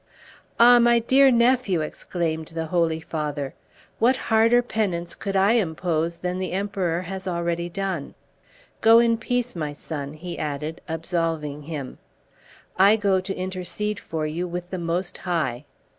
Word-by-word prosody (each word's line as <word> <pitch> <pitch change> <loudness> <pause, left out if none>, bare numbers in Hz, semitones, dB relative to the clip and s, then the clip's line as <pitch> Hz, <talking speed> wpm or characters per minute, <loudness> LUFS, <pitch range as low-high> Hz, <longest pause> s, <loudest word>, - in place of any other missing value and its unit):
"Ah! 240 +1 +8
my 235 0 +5
dear 265 +4 +5
nephew," 235 -7 +3
exclaimed 160 0 -3
the 165 0 -2
Holy 165 -1 +1
Father, 150 -4 -4 0.5
"what 250 +3 +4
harder 230 +1 +3
penance 185 -8 -2
could 195 0 -5
I 195 +2 +4
impose 170 -5 0
than 180 +1 -3
the 185 -1 -3
Emperor 185 -3 -1
has 190 +1 -6
already 170 -1 -1
done? 190 -5 -4 0.7
Go 225 +1 +7
in 230 -1 +4
peace, 245 0 -1
my 150 -3 -3
son," 145 -1 -6
he 170 +3 -7
added, 150 +1 -4
absolving 160 -3 -2
him, 145 -3 -6 0.8
"I 200 +3 +7
go 200 -3 +2
to 195 +1 -4
intercede 185 +3 -3
for 160 -1 -4
you 165 +4 -3
with 175 +1 -6
the 185 - -3
Most 175 +2 -2
High." 150 -8 -2
180 Hz, 145 wpm, -24 LUFS, 160-205 Hz, 0.8 s, Ah